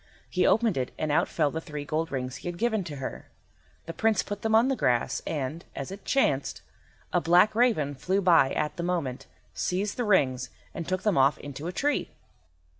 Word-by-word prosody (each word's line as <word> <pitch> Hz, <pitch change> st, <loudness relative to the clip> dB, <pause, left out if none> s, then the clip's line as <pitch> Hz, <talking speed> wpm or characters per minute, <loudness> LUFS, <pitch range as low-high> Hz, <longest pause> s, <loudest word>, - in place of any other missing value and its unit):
He -, -, +1 dB
opened 225 Hz, -7 st, +3 dB
it 130 Hz, -1 st, -1 dB
and 155 Hz, -, -1 dB
out 145 Hz, -, +3 dB
fell 150 Hz, -3 st, 0 dB
the 160 Hz, -, -4 dB
three 150 Hz, -2 st, -6 dB
gold 160 Hz, +3 st, -2 dB
rings 130 Hz, -1 st, -3 dB
he -, -, -8 dB
had 175 Hz, -1 st, -4 dB
given 220 Hz, -1 st, 0 dB
to 150 Hz, -4 st, -6 dB
her. 135 Hz, -1 st, -6 dB, 0.6 s
The 165 Hz, -, -6 dB
Prince 220 Hz, -1 st, +2 dB
put 205 Hz, 0 st, -6 dB
them 220 Hz, 0 st, +2 dB
on 230 Hz, +3 st, +5 dB
the 270 Hz, -, +1 dB
grass, 120 Hz, -, +1 dB
and, 150 Hz, +2 st, -3 dB
as 135 Hz, -, -5 dB
it 195 Hz, +1 st, -9 dB
chanced, 140 Hz, -, +1 dB, 0.5 s
a 175 Hz, -, +3 dB
black 175 Hz, +6 st, +5 dB
raven 215 Hz, -, +2 dB
flew 185 Hz, +8 st, 0 dB
by 165 Hz, -8 st, +5 dB
at 150 Hz, 0 st, -2 dB
the -, -, -2 dB
moment, 170 Hz, -8 st, -2 dB, 0.3 s
seized 195 Hz, +3 st, -2 dB
the 245 Hz, -, 0 dB
rings, 135 Hz, -, +2 dB, 0.2 s
and 165 Hz, -, -5 dB
took 185 Hz, 0 st, -1 dB
them 210 Hz, -9 st, +2 dB
off 135 Hz, +2 st, +4 dB
into 145 Hz, +3 st, -7 dB
a -, -, -2 dB
tree. 290 Hz, +9 st, 0 dB
170 Hz, 205 wpm, -27 LUFS, 140-205 Hz, 0.6 s, on